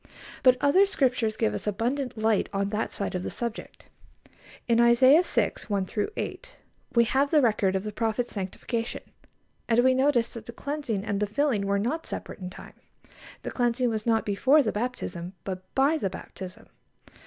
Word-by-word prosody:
But 255 -1 +6
other 370 +8 +5
Scriptures 250 - 0
give 220 - +1
us - - -5
abundant 240 +5 -1
light 220 -1 +1
on 200 0 -1
that 215 +2 -2
side 200 - -3
of 180 - -2
the - - -4
subject. 235 -1 -6 0.8
In 235 -1 +3
Isaiah 255 +6 +6
vi. - - +1 0.2
1 200 -3 -1 0.3
8, - - -6 0.4
we 235 - +6
have 270 +4 +1
the 310 - +5
record 210 -4 +2
of 190 - -1
the 215 - -4
prophet's 225 +3 -1
sanctification, 225 +4 -4 0.7
and 235 +1 +4
we 260 0 +5
notice 255 -3 +2
that 225 -2 -9
the 235 - -7
cleansing 265 -7 -3
and 205 -2 -1
the 210 - 0
filling 215 -3 0
were 200 0 +2
not 250 +11 -2
separate - - -6
in 180 -1 -6
time. 185 - -12 0.7
The - - -4
cleansing 245 0 +1
was 220 0 -3
not 225 -1 +2
before 265 +9 +4
the 220 - 0
baptism, 200 -6 -4
but 185 -1 -4
by 285 +4 +3
the 195 - -1
baptism. 190 +3 -9
230 Hz, 175 wpm, -27 LUFS, 205-255 Hz, 0.8 s, But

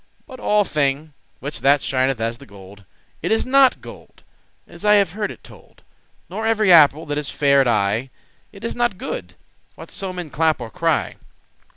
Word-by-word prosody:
But 260 -4 -12
all 210 -2 +2
thing, 150 -2 -2 0.3
which 145 +3 -6
that 140 +1 +4
shineth 130 -2 -1
as 115 +1 -3
the 140 - -14
gold, 100 0 -15 0.4
It - - -2
is 220 - +1
not 270 0 +4
gold, - - -14 0.4
as - - -13
I 210 0 +5
have 200 -5 +3
heard 210 +2 -3
it - - -11
told; - - -18 0.4
Nor 220 0 -4
every 215 -4 +4
apple 155 -1 +6
that 145 0 -2
is 145 - -5
fair 140 -1 +3
at 135 - +1
eye, 115 +3 0 0.4
It 200 0 -14
is 230 - -4
not 240 -5 0
good, 90 - -6 0.4
what - - -12
so 190 -1 -3
men 180 -4 -7
clap* 160 0 +1
or 115 -2 -8
cry. - - -1
150 Hz, 190 wpm, -20 LUFS, 130-205 Hz, 0.4 s, apple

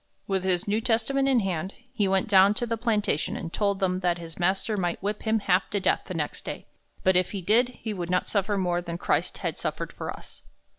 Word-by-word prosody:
With 190 -2 -1
his 185 -1 +1
New 210 +2 +1
Testament 245 +4 +1
in 255 -3 +4
hand, 190 -1 -3 0.2
he 210 -6 +1
went 190 0 +1
down 200 0 +6
to 240 - -1
the 230 -1 -1
plantation 215 - 0
and 165 - -6
told 200 -2 +1
them 185 -2 +1
that 175 -2 +1
his 165 -1 -10
master 190 +4 +1
might 175 -3 -1
whip 210 +1 -2
him 220 -1 +1
half 185 -1 +2
to 205 - 0
death 185 - +1
the 185 - -5
next 150 -3 -3
day, - - -6 0.4
but 190 0 +4
if 180 +2 +2
he 195 - -3
did, 225 +7 +4
he 225 -3 -6
would 175 -3 -4
not 180 0 +1
suffer 205 0 0
more 175 -2 0
than 170 -1 -5
Christ - - 0
had - - -3
suffered - - -3
for - - -6
us. - - -9
195 Hz, 235 wpm, -26 LUFS, 180-215 Hz, 0.4 s, down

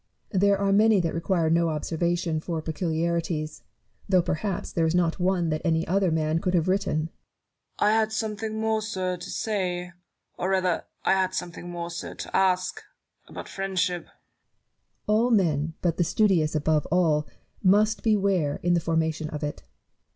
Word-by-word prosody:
Barrow. 190 - +1
There 200 +1 +4
are 195 0 +1
many 215 0 +5
that 170 -2 -1
require 165 -1 0
no 170 0 +3
observation 165 +1 -1
for 165 0 -3
peculiarities; 160 -1 -2 0.5
though 185 -2 +4
perhaps 180 +4 -2
there 165 -1 +1
is 160 - 0
not 175 -1 +1
one 180 -2 +1
that 155 0 -1
any 165 -2 +1
other 190 +1 +2
man 160 0 +1
could 180 +1 0
have 165 -1 +2
written. 190 -3 +1
Newton. 160 - -5 0.7
I 210 - +3
had 220 0 +2
something 220 0 -3
more, 220 0 +1
sir, 185 -4 -2
to 175 +2 -8
say 180 -4 -2 0.2
— - - -49
or 185 - -1
rather 185 -2 +1
— - - -44
I - - +4
had 185 -1 +1
something 175 -1 -5
more, 170 0 -5
sir, 170 - -6
to - - -6
ask 185 -1 +1 0.2
— - - -44
about - - -8
Friendship. 185 -2 -1
Barrow. - - -27 0.9
All 220 +3 +3
men, 160 -8 +1
but 170 -3 +1
the 175 - +3
studious 170 -5 +2
above 155 0 +1
all, 155 -3 +2 0.3
must 210 +3 +3
beware 195 -9 +1
in 175 0 +3
the 175 - +3
foi'mation 160 -1 -1
of 150 0 -5
it. 145 - -4
175 Hz, 180 wpm, -26 LUFS, 160-195 Hz, 0.9 s, many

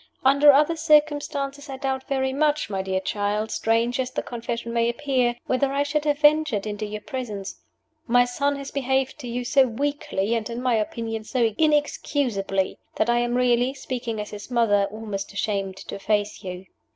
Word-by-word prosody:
Under 280 +2 +7
other 300 +4 +3
circumstances 290 -2 +1
I 265 - -5
doubt 265 -1 -3
very 265 -1 0
much, 295 -4 +1
my 190 -1 -1
dear 190 0 -1
child 205 +3 -1
strange 230 +3 +1
as 255 -1 0
the - - -3
confession 235 -1 -4
may 235 0 +2
appear 250 -1 0
whether 270 +2 +1
I 280 +1 +1
should 295 +1 -1
have 295 -1 +2
ventured 295 -8 +3
into 210 0 -4
your 210 0 -6
presence. 210 -3 -6 0.5
My 245 +1 +5
son 280 +4 0
has 275 0 -7
behaved 265 0 0
to 255 - -7
you 245 +1 -3
so 270 0 +4
weakly, 235 -5 -1
and 230 0 -1
(in 235 0 -4
my 250 -1 +1
opinion) 225 0 -2
so 230 -1 0
inexcusably, 275 -10 0 0.2
that 240 - +2
I 240 - +3
am 240 0 0
really, 250 +1 +2
speaking 245 -5 -4
as 210 - -5
his 210 +2 -8
mother, 225 -5 +3
almost 205 -1 -6
ashamed 195 -2 -2
to - - -7
face 205 +1 -1
you." 185 0 -6
245 Hz, 180 wpm, -24 LUFS, 215-275 Hz, 0.5 s, Under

